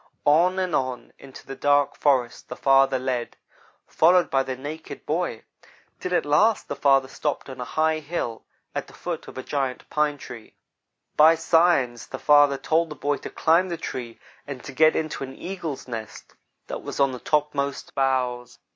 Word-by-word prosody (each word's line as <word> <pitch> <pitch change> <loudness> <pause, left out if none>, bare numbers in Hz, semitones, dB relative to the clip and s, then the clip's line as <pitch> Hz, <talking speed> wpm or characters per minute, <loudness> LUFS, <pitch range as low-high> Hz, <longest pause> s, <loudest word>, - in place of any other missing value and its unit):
On 170 +5 +4
and 185 -3 -1
on 130 -2 -3
into 135 -1 -13
the 135 - -7
dark 145 +1 +2
forest 130 -5 0
the - - -5
father 135 -1 +4
led, 125 -2 -3 0.5
followed 175 +2 +3
by 135 - +3
the 130 -1 -4
naked 150 +5 -8
boy, 160 -8 -2 0.6
till 180 0 -2
at - - +1
last 200 +10 +3
the - - -4
father 135 -2 +3
stopped 150 +2 -3
on 130 -1 -8
a - - -4
high 155 +3 +1
hill, 145 -7 -4 0.3
at - - -4
the - - -15
foot - - -5
of - - -11
a 130 - -5
giant 135 -3 -3
pine 150 -1 +1
tree. 120 -4 -11 0.6
By 160 +2 +7
signs 160 -7 +2
the - - -6
father 145 -2 +5
told 160 +4 +1
the 150 - -7
boy 145 -1 -1
to - - -8
climb 170 +4 +2
the 170 - -3
tree 120 -6 -6 0.3
and 135 -3 -7
to - - -8
get 155 +4 +4
into 155 -3 -2
an 135 0 -8
eagle's 170 -8 -6
nest 115 -3 -8 0.3
that - - -6
was - - -7
on 140 -1 +3
the 125 - -7
topmost 145 -1 -1
boughs. 125 -2 -1
145 Hz, 180 wpm, -24 LUFS, 130-160 Hz, 0.6 s, By